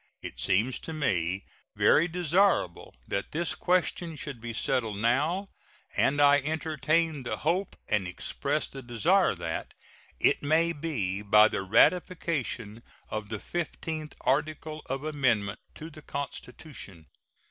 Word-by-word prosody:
It - - -7
seems 105 +7 +1
to 160 - -7
me 95 - 0 0.3
very 165 +3 +5
desirable 175 - +1
that 100 - -3
this 170 +2 0
question 175 -2 0
should 140 -5 -7
be 120 0 -5
settled 115 -3 -1
now, 150 - +1 0.5
and 145 +1 +2
I 145 0 +7
entertain 155 +1 0
the 125 - -3
hope 180 +5 0
and 105 -4 +1
express 140 +11 -2
the 135 - -9
desire 120 -4 +2
that - - -5 0.4
it - - +3
may 160 +3 +2
be 120 - -2
by 105 +1 +6
the - - -2
ratification 125 - +1 0.3
of 110 -1 -4
the 110 - -3
fifteenth 160 +2 -4
article 155 +2 -1
of 135 +2 -3
amendment 125 -9 0 0.2
to 160 +2 -8
the 155 - -12
Constitution. 125 - -7
145 Hz, 130 wpm, -28 LUFS, 110-160 Hz, 0.5 s, I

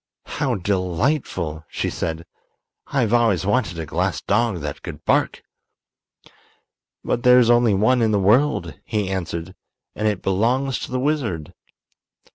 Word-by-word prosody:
"How 130 -4 +1
delightful!" 95 - -1
she - - -2
said. 80 0 -4 0.6
"I've 120 -6 0
always 115 -7 +3
wanted 105 -5 0
a 80 - -4
glass - - -1
dog 105 -4 0
that 75 0 -5
could - - -9
bark." - - +1 1.6
"But 120 - -1
there 125 0 +6
is 120 -1 +5
only 120 -3 +4
one 120 +5 +3
in 110 - +3
the 105 - +2
world," 120 +10 +2
he 105 -4 -2
answered, 85 -3 -4 0.4
"and 110 - -1
it 105 -3 -1
belongs 125 +8 +1
to - - -7
the 130 - -1
wizard." 125 - -2
105 Hz, 140 wpm, -22 LUFS, 90-125 Hz, 1.6 s, there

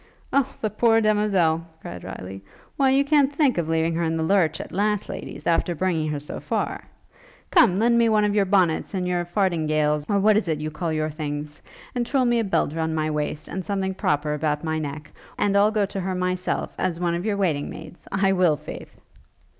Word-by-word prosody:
'O 275 -1 +2
the 215 - 0
poor 225 +1 +3
demoiselle!' 200 -7 +2 0.2
cried 90 - -8
Riley, 95 +1 -8 0.3
'why 270 -1 +3
you 275 +1 +3
can't 285 -1 +3
think 280 - +2
of 160 -2 -2
leaving 165 0 +1
her 170 +1 -1
in 165 0 0
the 160 - -1
lurch, 175 -1 +2
at - - -7
last, 210 +2 0
ladies, - - -7
after 170 +1 +1
bringing 165 -3 0
her 150 -1 -2
so 145 - -7
far? - - -3 0.7
Come, 235 - +5
lend 235 +2 +3
me 230 -1 +4
one 215 -1 +3
of 205 - +1
your 205 -1 +3
bonnets 185 -1 +1
and 180 -1 -1
your 175 -1 0
fardingales, 155 -5 0
or 205 - +2
what 210 +1 +4
is 215 - 0
it 160 -2 0
you 155 0 -4
call 165 +1 -3
your 155 0 -1
things? 150 -1 -5 0.3
And 245 - 0
twirl 260 +1 +1
me 240 -1 +2
a - - +1
belt 190 -7 0
round 160 0 -1
my 155 0 0
waist, 150 0 -3
and 190 - -4
something 190 0 -2
proper 150 -4 0
about 150 0 -1
my 160 -1 -1
neck, 150 0 -6 0.3
and 200 -1 +1
I'll 200 +1 +5
go 215 -2 +1
to 195 0 -5
her 185 0 -2
myself, 180 0 -2
as 170 -2 -1
one 175 -1 0
of 170 +1 -2
your 210 -1 -1
waiting 160 -8 0
maids: 160 +2 -11
I 195 0 +2
will, 180 -5 +3
faith!' - - -10
180 Hz, 215 wpm, -24 LUFS, 155-210 Hz, 0.7 s, Come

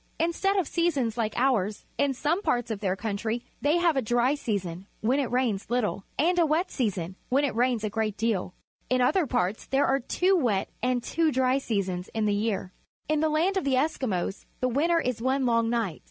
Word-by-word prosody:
Instead 340 +5 +1
of 365 -6 +1
seasons 285 -10 0
like 220 -2 -1
ours, 215 -6 +1
in 285 -1 +2
some 315 +9 0
parts 245 - 0
of 215 - -3
their 190 -2 0
country 220 +3 -3 0.2
they 295 +4 +3
have 345 -3 +3
a - - +3
dry 245 +3 +3
season, 195 - -3
when 250 +6 +2
it 265 -5 -1
rains 245 -6 0
little, 235 -5 0
and 350 +5 +2
a 335 - +5
wet 325 +5 +1
season, 190 - -2
when 275 +3 +3
it 285 - 0
rains 240 -2 +1
a 215 - 0
great 215 -2 0
deal. 210 -5 -1 0.4
In 255 +1 +2
other 330 +6 +3
parts 220 -5 -1
there 270 +1 +2
are 270 - +2
two 365 +9 +1
wet 230 - +1
and 250 0 0
two 330 -2 +1
dry 260 0 +2
seasons 190 -7 -2
in 220 -1 +1
the 205 - +2
year. 195 -4 -2 0.4
In 305 0 +1
the 315 +1 +2
land 385 +4 +1
of 380 - 0
the 275 -1 +2
Eskimos 205 - -3
the 255 - +1
winter 335 +2 +3
is 250 -6 -2
one 260 +2 +1
long 230 -1 +2
night. 225 -9 -1
245 Hz, 210 wpm, -27 LUFS, 215-290 Hz, 0.4 s, a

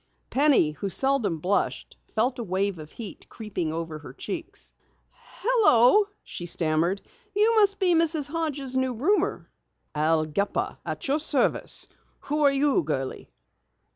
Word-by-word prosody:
Penny, 275 - +4
who 175 +6 -5
seldom 240 -5 +1
blushed, 185 +6 -1
felt 245 +4 -1
a - - -2
wave 190 -2 -1
of 155 -1 -9
heat 225 -4 -9
creeping 190 -8 -4
over 160 -1 -5
her 145 -4 -11
cheeks. 370 - -6 0.7
"Hello," 415 - +5 0.2
she 175 - -7
stammered. 170 +3 0 0.3
"You 430 +3 +4
must 400 -2 +4
be 370 -3 +3
Mrs. 325 -3 +1
Hodges' 290 -4 -3
new 260 -1 0
roomer." 385 - 0 0.4
"Al 155 +1 +2
Gepper, 200 +7 -2
at - - -3
your 285 +3 +1
service. 295 -4 +1 0.3
Who 300 +2 -2
are 285 -1 +5
you, 275 -3 +2
girlie?" 140 -4 -4
245 Hz, 140 wpm, -26 LUFS, -, 0.7 s, Hello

